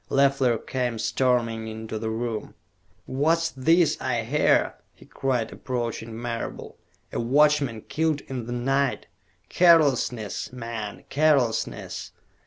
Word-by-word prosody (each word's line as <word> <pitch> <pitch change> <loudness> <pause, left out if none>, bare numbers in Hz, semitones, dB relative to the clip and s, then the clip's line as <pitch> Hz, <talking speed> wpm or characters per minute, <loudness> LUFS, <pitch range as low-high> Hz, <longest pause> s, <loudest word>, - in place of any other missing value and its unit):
Leffler 135 -3 +3
came 125 0 -2
storming 115 0 0
into 110 0 -5
the 110 - -3
room. 110 -1 -4 0.5
"What's 165 +5 +1
this 165 +5 +2
I 120 -3 0
hear?" 145 +7 +2 0.2
he - - -17
cried, 125 -4 -1
approaching 115 -2 -4
Marable. 115 -1 -5 0.3
"A - - -1
watchman 140 -1 +3
killed 155 +1 -1
in 125 -4 -6
the - - -5
night? 135 +2 0 0.4
Carelessness, 140 - +3
man, 115 -4 -6
carelessness! 140 -6 0
125 Hz, 110 wpm, -25 LUFS, 115-140 Hz, 0.5 s, Leffler